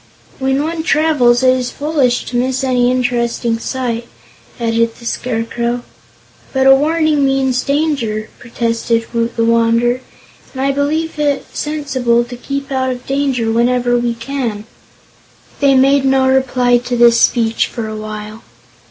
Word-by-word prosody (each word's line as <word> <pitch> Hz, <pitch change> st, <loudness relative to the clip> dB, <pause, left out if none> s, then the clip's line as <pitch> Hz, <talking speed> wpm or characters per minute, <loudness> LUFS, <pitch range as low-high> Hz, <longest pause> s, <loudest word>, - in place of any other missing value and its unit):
"When 265 Hz, +1 st, 0 dB
one 325 Hz, +1 st, -3 dB
travels, 290 Hz, -7 st, +2 dB
it 255 Hz, 0 st, +5 dB
is 250 Hz, -1 st, -2 dB
foolish 280 Hz, -5 st, 0 dB
to 245 Hz, -, -6 dB
miss 260 Hz, +2 st, 0 dB
any 250 Hz, -2 st, +2 dB
interesting 240 Hz, -2 st, 0 dB
sight," 240 Hz, -2 st, -3 dB, 0.5 s
added 230 Hz, 0 st, 0 dB
the 235 Hz, -, -14 dB
Scarecrow. 235 Hz, +1 st, -2 dB, 0.7 s
"But 265 Hz, -1 st, +1 dB
a 270 Hz, -, +8 dB
warning 305 Hz, +1 st, +2 dB
means 265 Hz, -2 st, +1 dB
danger," 275 Hz, -8 st, -1 dB
protested 230 Hz, -1 st, -1 dB
Woot 230 Hz, 0 st, -1 dB
the 230 Hz, -, +1 dB
Wanderer, 230 Hz, +2 st, +2 dB, 0.5 s
"and 260 Hz, -, -5 dB
I 275 Hz, -, +2 dB
believe 305 Hz, +3 st, -1 dB
it 290 Hz, -2 st, 0 dB
sensible 265 Hz, -6 st, 0 dB
to 245 Hz, +1 st, -9 dB
keep 275 Hz, +2 st, -5 dB
out 260 Hz, -1 st, 0 dB
of 250 Hz, -1 st, -5 dB
danger 270 Hz, -5 st, 0 dB
whenever 245 Hz, +1 st, +1 dB
we 240 Hz, -1 st, 0 dB
can." 230 Hz, -4 st, -4 dB, 0.9 s
They 275 Hz, -2 st, +4 dB
made 275 Hz, +1 st, +4 dB
no 265 Hz, -1 st, +3 dB
reply 255 Hz, -2 st, +2 dB
to 245 Hz, 0 st, -3 dB
this 235 Hz, -1 st, +5 dB
speech 230 Hz, -2 st, +2 dB
for 230 Hz, -2 st, -5 dB
a 215 Hz, -, -6 dB
while. 215 Hz, 0 st, -7 dB
250 Hz, 145 wpm, -16 LUFS, 235-270 Hz, 0.9 s, a